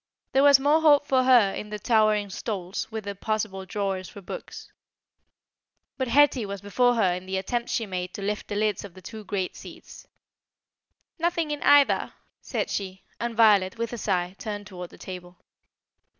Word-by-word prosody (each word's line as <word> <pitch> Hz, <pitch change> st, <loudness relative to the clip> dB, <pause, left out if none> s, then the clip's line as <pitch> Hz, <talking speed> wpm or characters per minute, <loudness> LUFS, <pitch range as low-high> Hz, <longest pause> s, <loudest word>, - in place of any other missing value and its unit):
There 270 Hz, -, +3 dB
was 280 Hz, -1 st, +7 dB
more 295 Hz, +4 st, +3 dB
hope 290 Hz, -2 st, +5 dB
for 260 Hz, -2 st, +2 dB
her 240 Hz, -7 st, +5 dB
in 210 Hz, -, -6 dB
the 210 Hz, -, -4 dB
towering 215 Hz, -2 st, +2 dB
stalls, 190 Hz, -3 st, -4 dB
with 220 Hz, -1 st, -5 dB
their 200 Hz, 0 st, -4 dB
possible 200 Hz, -2 st, -3 dB
drawers 195 Hz, -3 st, -3 dB
for -, -, -11 dB
books. 190 Hz, -, -9 dB, 1.2 s
But 260 Hz, -, -2 dB
Hetty 270 Hz, 0 st, +4 dB
was 200 Hz, -1 st, -5 dB
before 245 Hz, +5 st, +2 dB
her 190 Hz, -6 st, +2 dB
in 180 Hz, +1 st, -6 dB
the 190 Hz, 0 st, -2 dB
attempt 235 Hz, +5 st, -2 dB
she 230 Hz, -, -1 dB
made 180 Hz, -2 st, -4 dB
to 200 Hz, -, -6 dB
lift 210 Hz, +1 st, -3 dB
the 205 Hz, -, -4 dB
lids 210 Hz, -1 st, 0 dB
of 195 Hz, -3 st, -11 dB
the 185 Hz, -, -14 dB
two 220 Hz, +3 st, -9 dB
great 195 Hz, -3 st, -3 dB
seats. -, -, -12 dB, 1.1 s
"Nothing 335 Hz, -2 st, 0 dB
in 295 Hz, -, -3 dB
either," 285 Hz, -1 st, +4 dB, 0.3 s
said -, -, -3 dB
she; 190 Hz, -1 st, -4 dB, 0.2 s
and 235 Hz, -1 st, -3 dB
Violet, 205 Hz, -4 st, +4 dB
with 230 Hz, +1 st, -3 dB
a -, -, -4 dB
sigh, 180 Hz, -2 st, -1 dB
turned 205 Hz, -2 st, -5 dB
towards 180 Hz, -3 st, -8 dB
the -, -, -16 dB
table. 180 Hz, -1 st, -9 dB
210 Hz, 180 wpm, -26 LUFS, 190-240 Hz, 1.2 s, was